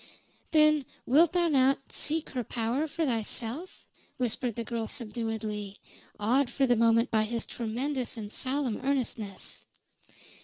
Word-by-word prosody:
"Then 305 -2 +5 0.2
wilt 315 +6 +5
thou 350 -1 +3
not 270 -2 +2
seek 315 +1 -1
her 250 -2 -2
power 240 +7 -1
for 320 +2 -1
thyself?" 240 - -2 0.3
whispered 245 -1 -1
the 235 - -3
girl 230 -1 -3
subduedly, 215 -3 -3 0.4
awed 245 +5 +3
for 275 - +1
the 245 -2 +4
moment 230 +1 +3
by 220 - +3
his 230 +1 -2
tremendous 245 +2 -3
and 210 -1 -6
solemn 265 -4 -1
earnestness. 235 -7 -3
245 Hz, 130 wpm, -29 LUFS, 225-280 Hz, 0.4 s, Then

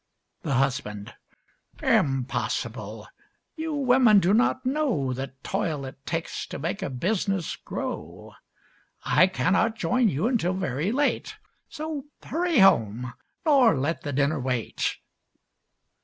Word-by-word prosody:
THE 135 - -1
HUSBAND 125 -6 -1 0.7
Impossible! 135 -2 -1 0.5
You 320 -2 -3
women 250 -6 +5
do 185 +1 +2
not 250 +3 +2
know 255 - 0
The 130 +1 -5
toil 150 -4 -2
it 135 +1 -10
takes 165 0 -3
to - - -6
make 170 +8 -3
a 190 - -2
business 185 - -1
grow. - - -6 0.7
I 185 - +5
cannot 190 +4 +1
join 245 0 +2
you 160 +3 -1
until 225 -7 +1
very 155 +1 -1
late, 285 +4 0 0.3
So 310 -3 -5 0.2
hurry 340 -1 0
home, 125 - +4 0.3
nor 265 - +5
let 145 +6 -1
the 145 - -4
dinner 140 +2 +1
wait. 125 -3 -2
180 Hz, 120 wpm, -26 LUFS, -, 0.7 s, women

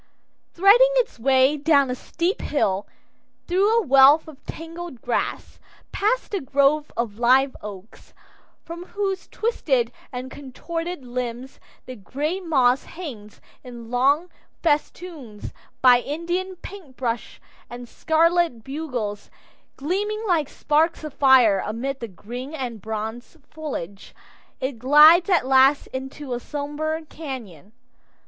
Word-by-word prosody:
Threading 410 +8 +6
its - - 0
way 265 +3 +3
down 280 -3 +3
a - - -2
steep 340 +8 -2
hill; 200 -9 -1 0.6
through 385 +4 +2
a 460 - +1
wealth 275 +3 +6
of 295 -3 -13
tangled 330 -4 -8
grasses; 240 +1 -3 0.3
past 435 +3 -1
a 400 - -1
grove 285 +2 +1
of 230 -2 -3
live 260 +3 +4
oaks, 205 +1 -11 0.5
from 340 +1 -7
whose 390 -2 -3
twisted 270 - -1 0.2
and 255 0 -6
contorted 330 +3 -6
limbs 245 +1 -5 0.3
the 255 - -8
gray 290 - -3
moss 270 -7 +2
hangs 240 - -9 0.2
in 240 -2 -10
long 285 +8 +2 0.3
festoons, 295 - -3 0.3
by 250 -1 +7
Indian 345 +7 -3
paintbrush 265 -11 -6 0.3
and 245 0 -9
scarlet 325 -4 +1
bugler 255 -8 -4 0.6
gleaming 410 +9 -2
like 325 -6 +1
sparks 315 +2 0
of 305 -3 -6
fire 250 -8 +5
amid 260 +6 -4
the 230 - -5
green 245 - -8
and 240 -7 -5
bronze 220 - -6
foliage, 205 - -7 0.4
it 260 -3 -4
glides 305 - +7
at 355 -9 +3
last 270 +2 +4
into 265 +1 -6
a 240 - -2
somber 295 +3 -4
cañon. 250 - -9
275 Hz, 120 wpm, -23 LUFS, 245-330 Hz, 0.6 s, by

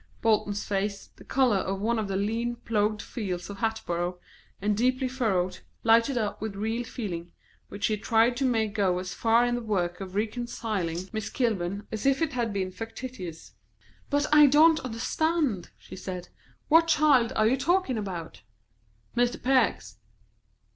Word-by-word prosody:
Bolton's 210 -2 +1
face, 200 0 -2
the - - -13
colour 255 -6 +2
of 190 0 -2
one 225 +3 0
of 215 - -2
the 195 - -3
lean 225 +4 -1
ploughed 215 -3 -1
fields 190 -4 -4
of 200 - -8
Hatboro', 180 -6 -2 0.4
and 205 +1 +1
deeply 255 +4 +1
furrowed, 190 -8 0 0.2
lighted 230 +3 +4
up 215 -4 -2
with 215 -2 -4
real 220 +4 -2
feeling, 175 -8 -5 0.4
which 200 +1 -3
he 215 - +1
tried 230 +3 +3
to 275 - -1
make 225 -5 +1
go 195 -4 +1
as 180 0 -4
far 230 +1 +3
in 245 - 0
the 240 - -1
work 185 -5 -1
of 190 0 -7
reconciling 215 -5 -2 0.2
Miss 220 -1 -3
Kilburn 205 -5 -1
as 220 +4 -2
if 275 -1 +3
it 310 -3 -1
had 235 -3 -1
been 190 -2 -2
factitious. 210 -4 -7 0.6
"But 290 0 +2
I 300 -1 +9
don't 310 +3 +6
understand," 255 - -1
she - - -12
said. 180 -1 -6 0.4
"What 330 +2 +5
child 290 -7 +4
are 215 - +3
you 235 +4 +4
talking 275 -3 +1
about?" 180 -5 -6 0.7
"Mr. 245 0 +1
Peck's." 260 +1 +1
220 Hz, 160 wpm, -27 LUFS, 195-245 Hz, 0.7 s, I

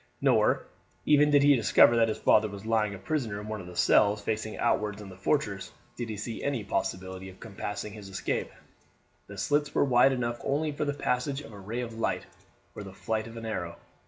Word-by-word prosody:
Nor, - - +3 0.4
even 150 0 +5
did 145 -1 +5
he 145 0 +6
discover 115 +1 +5
that 115 -1 +4
his 110 - -2
father 110 0 +4
was 100 +1 -9
lying 110 -2 +1
a - - -8
prisoner 110 -1 -2
in 105 - -8
one 110 -2 -4
of 90 - -10
the 90 - -10
cells 105 +3 +4
facing 110 +1 -3
outwards 105 -3 0
in 105 -2 -9
the 95 - -11
fortress, 95 - -1 0.2
did 120 -2 -5
he 110 - -4
see 110 +2 -5
any 140 -6 -1
possibility 95 -1 -3
of 95 - -15
compassing 105 -1 -6
his 105 -2 -10
escape. 95 -1 -2 0.8
The 100 - -10
slits 145 +8 0
were - - +4
wide 125 0 +5
enough 120 -2 -2
only 150 +2 0
for 145 +1 -2
the 145 -1 -1
passage 135 +1 -1
of 115 -6 -12
a 100 - -10
ray 110 +6 -4
of 115 -2 -6
light - - -1 0.5
or - - -8
the 95 -2 -9
flight 110 +2 -2
of 115 0 -10
an 115 - -7
arrow. 90 -6 -4
110 Hz, 215 wpm, -28 LUFS, 100-125 Hz, 0.8 s, he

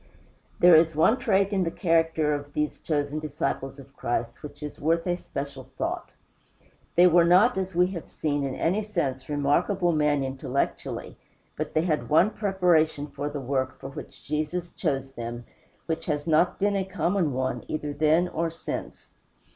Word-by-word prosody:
There 175 -1 +7
is 160 0 +4
one 220 +11 +4
trait 200 -4 +2
in 190 -2 +2
the 165 - 0
character 165 -3 +1
of 145 0 -5
these 150 0 -2
chosen 145 -1 -1
disciples 150 -3 -3
of 140 - -14
Christ 120 0 -3
which 150 0 -9
is 150 - -7
worth 165 +2 +1
a 175 -1 +1
special 140 -6 -6
thought. - - -3 0.8
They 175 - +7
were 175 -1 +6
not, 185 +8 +5
as 190 -1 -3
we 180 +1 +5
have 170 -4 -7
seen, 145 -2 -1
in 135 -1 -2
any 185 +6 +1
sense 145 -11 -3
remarkable 170 +6 +1
men 150 -3 +2
intellectually, 130 - -3 0.4
but 155 +1 -4
they 155 - +3
had 155 -4 -1
one 170 +7 +5
preparation 175 -8 +2
for 145 +1 -3
the 145 0 -5
work 130 0 -2
for 135 - -7
which 135 - -10
Jesus 155 +4 -2
chose 135 -5 -2
them 120 -1 -6 0.4
which 165 0 -3
has 150 -2 -1
not 165 +2 +3
been 205 +1 +1
a 195 - +1
common 185 -3 0
one, 130 0 -2
either 150 -1 -3
then 155 +4 +3
or 165 -1 -1
since. 165 - -7
155 Hz, 170 wpm, -26 LUFS, 145-175 Hz, 0.8 s, There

